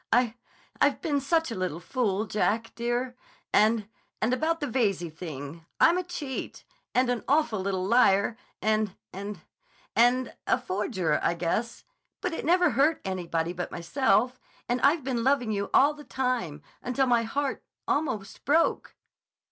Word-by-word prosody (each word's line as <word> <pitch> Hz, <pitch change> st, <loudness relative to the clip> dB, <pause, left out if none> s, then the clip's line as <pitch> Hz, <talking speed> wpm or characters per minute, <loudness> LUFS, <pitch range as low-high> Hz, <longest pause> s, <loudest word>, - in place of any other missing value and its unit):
I—I've 240 Hz, 0 st, 0 dB
been 290 Hz, -6 st, 0 dB
such 320 Hz, 0 st, +1 dB
a -, -, -3 dB
little 185 Hz, -4 st, -2 dB
fool, 215 Hz, 0 st, -1 dB
Jack, 225 Hz, +2 st, 0 dB
dear. 240 Hz, +1 st, -2 dB, 0.4 s
And—and 220 Hz, +2 st, +1 dB
about 325 Hz, +5 st, 0 dB
the 295 Hz, -, -2 dB
Veyze 200 Hz, -, 0 dB
thing—I'm 165 Hz, -, 0 dB
a -, -, -2 dB
cheat—and 295 Hz, -, -4 dB
an 245 Hz, -2 st, -1 dB
awful 275 Hz, -7 st, +2 dB
little 190 Hz, -1 st, -1 dB
liar—and—and—and—and 220 Hz, -, 0 dB
a -, -, +4 dB
forger, 185 Hz, -5 st, -1 dB
I 170 Hz, -, +1 dB
guess. 180 Hz, +7 st, -2 dB, 0.4 s
But 360 Hz, -, -2 dB
it 325 Hz, -, -4 dB
never 355 Hz, 0 st, +4 dB
hurt 280 Hz, +7 st, +3 dB
anybody 175 Hz, -3 st, -2 dB
but 175 Hz, 0 st, -5 dB
myself—and 245 Hz, +5 st, 0 dB
I've 290 Hz, +2 st, +4 dB
been 245 Hz, -3 st, -1 dB
loving 260 Hz, -4 st, +2 dB
you 200 Hz, -1 st, -2 dB
all 285 Hz, +2 st, +5 dB
the 295 Hz, 0 st, -12 dB
time—until 250 Hz, -, -2 dB
my 240 Hz, -2 st, +3 dB
heart—almost 260 Hz, -2 st, -3 dB
broke." 315 Hz, +4 st, +1 dB
235 Hz, 125 wpm, -27 LUFS, 195-275 Hz, 0.4 s, all